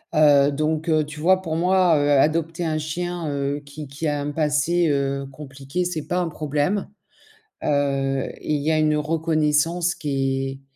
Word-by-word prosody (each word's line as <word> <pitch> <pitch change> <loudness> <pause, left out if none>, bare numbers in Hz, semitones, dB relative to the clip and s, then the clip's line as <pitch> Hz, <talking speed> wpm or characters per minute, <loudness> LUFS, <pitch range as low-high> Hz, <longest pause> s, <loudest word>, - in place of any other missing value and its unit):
heu, 145 -2 +5
donc, 155 +3 -1
heu, 155 -1 +3
tu 150 0 -9
vois? 185 +4 +3
Pour 160 -3 -3
moi, 180 -1 +3
heu, 145 0 +1
adopter 160 +4 +2
un 155 -1 -1
chien, 170 +2 -3
heu, 140 0 -2
qui 145 0 -9
qui 145 +4 -4
a 145 -1 -1
un 145 +1 -3
passé, 155 +3 +1
heu, 140 -1 -1
compliqué, 140 +4 -5
c'est 170 -4 -4
pas 180 - 0
un 175 -2 -1
problème. 150 +6 -1 0.8
Heu 135 -2 0 0.2
et 150 - -2
il 145 - -2
y 155 +2 0
a 155 - +2
une 155 -1 +2
reconnaissance 160 +2 +1
qui 135 -3 -2
150 Hz, 175 wpm, -23 LUFS, 145-165 Hz, 0.8 s, heu